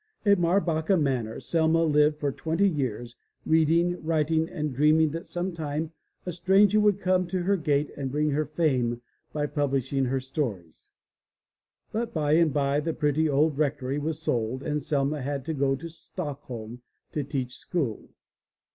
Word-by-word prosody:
At 200 -2 +5
Marbacka 175 0 +2
Manor 130 -7 -1
Selma 165 0 +2
lived 150 -1 +3
for 145 -2 -1
twenty 165 +8 +1
years, 125 - -2 0.3
reading, 165 +2 +2
writing, 160 0 +1
and 150 -2 -3
dreaming 155 +3 +4
that 165 +2 -6
sometime 160 -3 -3 0.3
a 180 - -2
stranger 195 +5 +4
would 205 -2 +3
come 185 -1 +1
to 180 0 -2
her 200 +2 +2
gate 150 -4 0
and 135 -2 -4
bring 150 +2 +1
her 150 +1 0
fame 130 -7 0 0.3
by 150 -1 -1
publishing 140 -2 0
her 135 +1 0
stories. 125 - -5 1.0
But 230 0 -3
by 150 -2 +1
and 160 0 +4
by 140 0 +1
the 160 +2 -2
pretty 150 +1 +1
old 145 +1 +2
rectory 140 -2 0
was 155 +1 -2
sold 125 -3 -1
and 150 -1 -1
Selma 145 0 0
had 140 0 -3
to 160 - -2
go 135 -2 +1
to 165 +5 -7
Stockholm 135 - -7 0.3
to 150 - -2
teach 130 -2 -4
school. 135 - -3
150 Hz, 155 wpm, -27 LUFS, 135-165 Hz, 1.0 s, At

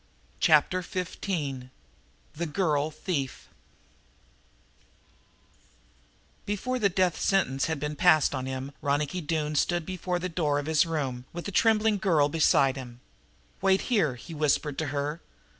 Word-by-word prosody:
Chapter 160 +3 +4
Fifteen 170 -8 -4 0.7
The 170 +2 -3
Girl 150 -3 0
Thief 155 -3 -4 3.0
Before 250 +6 -2
that 200 -5 +1
death 185 -2 +2
sentence 135 -9 +1
had 160 -2 -2
been 150 +1 -3
passed 155 -3 +4
on 130 -1 -3
him 130 +1 -5
Ronicky 145 +5 -1
Doone 155 -1 -2
stood 175 +3 +1
before 180 0 -2
the 180 +1 -3
door 160 -4 0
of 145 - -2
his 160 +1 +3
room, 135 -6 -3
with 175 0 -6
the 200 - -4
trembling 220 0 +3
girl 160 -7 +3
beside 140 -3 +3
him. 120 -2 -9 0.6
"Wait 190 0 +3
here," 155 - +2
he 165 +8 -10
whispered 150 -1 0
to 160 - -1
her. 145 +3 -3
155 Hz, 135 wpm, -27 LUFS, 145-180 Hz, 3.0 s, Chapter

